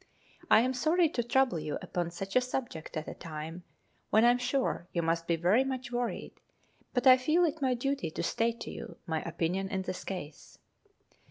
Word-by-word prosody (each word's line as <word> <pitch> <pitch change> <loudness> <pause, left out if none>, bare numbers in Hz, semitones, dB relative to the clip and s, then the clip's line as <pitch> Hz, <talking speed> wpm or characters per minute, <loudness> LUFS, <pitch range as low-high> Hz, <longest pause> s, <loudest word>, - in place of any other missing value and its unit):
I - - +7
am 255 +2 +1
sorry 320 +6 +3
to 255 - -1
trouble 250 -6 +2
you 150 -1 -3
upon 175 -1 -3
such 195 +3 -6
a 255 - +6
subject 245 -12 -4
at 155 - -4
a - - -5
time 160 +2 -7 0.5
when 220 +2 +5
I 240 - +7
am 245 - +1
sure 250 -8 -1
you 170 - 0
must 165 +1 0
be 170 - +3
very 180 +10 +3
much 260 -2 -4
worried, 240 -1 -3 0.5
but 250 0 0
I 255 -1 +9
feel 310 +7 +3
it 315 -1 -2
my 260 -2 +2
duty 275 - -1
to - - -4
state 230 0 0
to - - -5
you 230 - -8
my 160 -3 -1
opinion 175 +4 -2
in 190 -1 -2
this 185 -1 -5
case. 160 -6 -7
230 Hz, 200 wpm, -31 LUFS, 170-255 Hz, 0.5 s, I